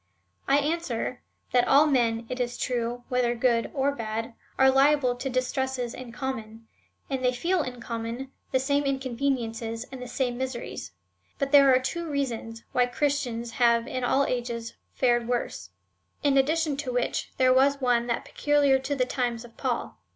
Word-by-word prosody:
I 275 - +5
answer, 290 -5 -2 0.3
that 245 -1 +3
all 285 +2 +6
men, 235 -5 +1
it 255 +1 -5
is 245 0 -2
true, 245 -1 -2
whether 245 -1 +1
good 235 -1 +2
or 280 0 +1
bad, 225 -2 -4 0.2
are 265 0 +6
liable 270 -1 +4
to 265 +2 -3
distresses 255 -1 -1
in 255 -2 -8
common, 225 -4 -5 0.4
and 265 -2 -3
they 250 - +4
feel 335 +8 0
in 250 -3 -5
common 235 +3 -5 0.2
the 260 - +3
same. 280 +2 +1
inconveniences, 245 -4 -2
and 260 -1 -8
the 250 - -6
same 245 0 -2
miseries; 260 -2 -5 0.4
but 275 -1 -1
there 280 -2 +7
are 255 - +5
two 335 +6 -3
reasons 235 -5 -3
why 250 -1 +3
Christians 245 -3 -1
have 235 -1 +3
in 255 0 -4
all 270 +3 +3
ages 235 -2 -3 0.2
fared 240 -2 +2
w^orse, 235 - -2 0.5
in 285 -1 +3
addi 275 +4 +3
tion 295 -4 -2
to 270 -3 -3
w^hich, 245 0 -1
there 255 -1 +5
was 275 +2 +4
one 245 -2 +2
that 235 - -1
was - - -16
peculiar 290 -2 +3
to 285 +2 -2
the 255 -2 +1
times 245 -2 -2
of 235 - -16
Paul. 250 - -3
255 Hz, 175 wpm, -27 LUFS, 235-275 Hz, 0.5 s, there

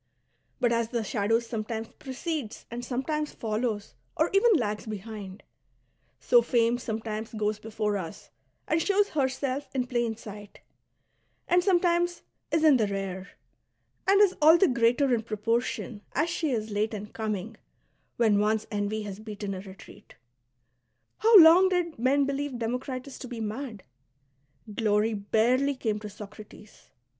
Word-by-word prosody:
But, 240 -2 +2
as 230 -1 0
the 235 -2 -1
shadow 210 +2 +1
sometimes 225 -1 -5
precedes 270 -3 -5
and 240 +1 -5
sometimes 295 +5 -2
follows 215 -1 -2 0.2
or 315 - +2
even 430 +4 +5
lags 215 -6 -2
behind, 210 -2 -7 0.8
so 485 - +5
fame 235 - +2
sometimes 220 -1 -4
goes 210 0 -1
before 210 -1 -2
us 165 -9 -8 0.4
and 315 +2 +1
shows 405 +3 +2
herself 275 -1 -1
in 255 -2 +1
plain 240 -2 -1
sight, 210 -2 -11 0.9
and 355 0 +3
sometimes 350 -2 +2 0.3
is 320 -1 +1
in 300 -4 +6
the 220 -3 +1
rear, 195 -1 -4 0.8
and 395 +1 +5
is 395 -3 +4
all 315 +3 +8
the 385 - +4
greater 245 +2 +2
in 230 - +1
proportion 225 0 -2
as 310 +5 0
she 325 -3 -1
is 220 -4 -2
late 215 +2 -1
in 205 0 -5
coming, 215 0 -4 0.6
when 220 -4 +3
once 215 +1 +1
envy 210 +1 -2
has 200 -1 -7
beaten 210 -2 -6
a 185 - -5
retreat. 190 0 -13 1.0
How 450 0 +7
long 350 +2 +8
did 350 -6 -1
men 275 +3 +3
believe 280 -1 -3
Democritus 250 +3 -4
^' - - -15
to 260 - -6
be 240 -2 -7
mad 220 -1 -5 0.8
I - - -9
Glory 210 +1 +1
barely 240 +7 +1
came 220 -4 -2
to 210 - -7
Soci*ates. 210 +1 -13
230 Hz, 150 wpm, -27 LUFS, 210-280 Hz, 1.0 s, all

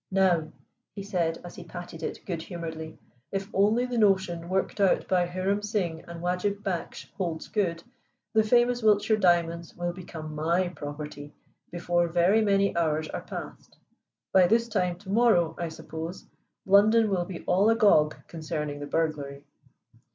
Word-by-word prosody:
"Now," 185 -5 +2 0.4
he 200 - -5
said 170 -5 -1
as 175 - -9
he 180 - -9
patted 175 -1 -9
it - - -5
good 170 -4 -3
humoredly, 160 -2 -7 0.3
"if 195 0 -3
only 215 +5 +3
the 245 -2 -2
notion 190 -5 +2
worked 190 +2 -1
out 195 - +3
by 180 -2 +2
Hiram 185 +3 -1
Singh 195 -6 -2
and 170 0 -8
Wajib 180 +3 -1
Baksh 185 -4 -4
holds 170 -5 -4
good, 170 -5 -1 0.5
the 220 - +5
famous 240 +2 +3
Wiltshire 215 0 +3
diamonds 170 -2 +1
will 175 0 -3
become 160 -4 -8
my 170 +4 +1
property 145 -2 -8 0.3
before 175 0 0
very 175 +6 +3
many 200 -2 +2
hours 155 -2 0
are - - -4
passed. - - -9 0.6
By 185 -2 +6
this 230 +4 +2
time 180 -6 -1
to 190 +1 -9
morrow, 200 -8 +4
I 170 -1 -2
suppose, 160 +2 -7 0.4
London 215 +3 +5
will 180 -2 0
be 175 -2 -8
all 195 +4 +3
agog 200 -9 +4
concerning 155 -3 -4
the 145 - -6
burglary." 145 -4 -2
175 Hz, 155 wpm, -27 LUFS, 165-200 Hz, 0.6 s, By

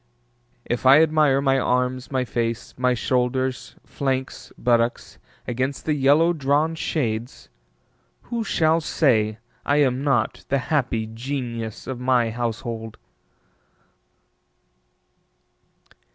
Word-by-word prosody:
If 120 - -2
I 135 +3 +8
admire 150 -4 +3
my 135 -1 +2
arms, 125 0 0
my 130 -2 -1
face, 115 -1 -3
my 125 0 +1
shoulders, 130 +1 -1
flanks, 130 -1 -3
buttocks 120 0 0 0.3
against 130 +3 -2
the 155 - +1
yellow 150 +4 +4
drawn 150 +1 +1
shades, 120 -7 -3 0.7
Who 235 -1 -3
shall 165 -5 +2
say 110 -9 +1 0.3
I 145 - +1
am 135 -2 +2
not 130 -6 0
the 140 - +2 0.2
happy 125 -6 0
genius 115 -1 -5
of 130 -2 -5
my 125 -2 +2
household? 115 -1 -4
130 Hz, 105 wpm, -23 LUFS, 120-140 Hz, 0.7 s, I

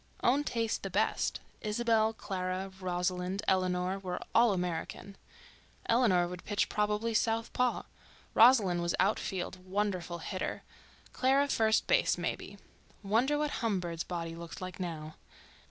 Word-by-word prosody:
Own 270 +4 +3
taste 230 -5 -1
the - - -4
best; - - 0 0.2
Isabelle, 220 0 +2
Clara, 190 -2 -4
Rosalind, 180 +1 -2
Eleanor, 185 0 +1
were 180 -2 -4
all 235 -1 +6
American. 180 +1 -3 0.7
Eleanor 215 -7 +3
would 180 0 -8
pitch, 205 -1 0
probably 210 +2 0
southpaw. 230 +3 +1 0.5
Rosalind 215 -7 +6
was 170 0 0
outfield, 185 -2 -1
wonderful 185 -3 -2
hitter, 185 +3 -4 0.5
Clara 270 +2 +3
first 220 -4 +3
base, - - +3
maybe. - - -4 0.5
Wonder 235 +9 +2
what 300 0 0
Humbird's 180 -7 -1
body 165 -2 -4
looked 170 +2 -8
like 185 -1 -7
now. 160 -4 -5
195 Hz, 120 wpm, -31 LUFS, 180-225 Hz, 0.7 s, all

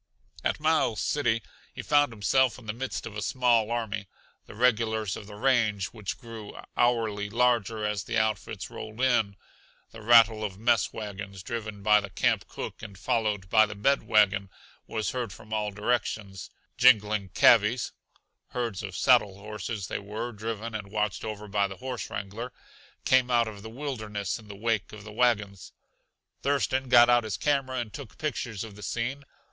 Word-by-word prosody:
At - - 0
Miles 155 -8 +2
City 120 -7 +1 0.3
he - - -6
found 145 -2 +3
himself 115 +4 +2
in 125 - -14
the 105 - -3
midst 130 +3 -4
of 110 - -8
a 105 - -3
small 120 0 +2
army, 110 -4 -3 0.4
the - - -11
regulars 110 -3 +1
of 100 - -9
the 105 - -10
range 110 -5 +2
which 105 -4 -5
grew 115 -3 -9 0.2
hourly 110 -4 +1
larger 115 -2 +1
as 105 -2 -1
the 115 - -2
outfits 110 -2 -1
rolled 110 -1 -8
in. 120 -6 +2 0.6
The 115 - -11
rattle 110 -1 +6
of 95 -3 -4
mess 115 -1 +2
wagons, 100 -3 -7
driven 110 -3 -5
by 105 +1 +6
the 100 - -7
camp - - +1
cook - - -7
and 100 -2 -9
followed 105 -3 0
by 110 +2 +5
the 105 - -7
bed 135 +8 +2
wagon, 100 -2 +3 0.4
was 110 -4 -2
heard 125 -5 -3
from 110 +3 -10
all 105 -1 0
directions. 105 -2 -2 0.3
Jingling 105 -5 +5
cavvies 115 +1 +5 0.6
(herds 115 -5 -2
of 100 -3 -6
saddle 105 -7 +4
horses 105 0 -5
they - - -3
were, 110 +4 -5
driven 110 +1 -5
and 105 -2 -5
watched 105 -2 -1
over 105 -1 -5
by 100 0 +1
the 95 -1 -9
horse 130 -2 -5
wrangler) 105 +5 -5 0.5
came 130 -1 +4
out 120 -2 +3
of 105 -2 -8
the 110 - -8
wilderness 110 -7 -4
in 110 - -15
the 100 - -9
wake 110 -1 -1
of 105 -1 -9
the 105 0 -10
wagons. 105 -5 0 0.7
Thurston 135 -2 0
got 120 -1 +8
out 120 -1 +4
his 110 -4 -3
camera 135 -3 0
and 115 -4 -4
took 140 -6 -9
pictures 120 -8 -3
of 110 -3 -9
the 105 - -12
scene. 120 +7 -3
110 Hz, 175 wpm, -28 LUFS, 105-120 Hz, 0.7 s, got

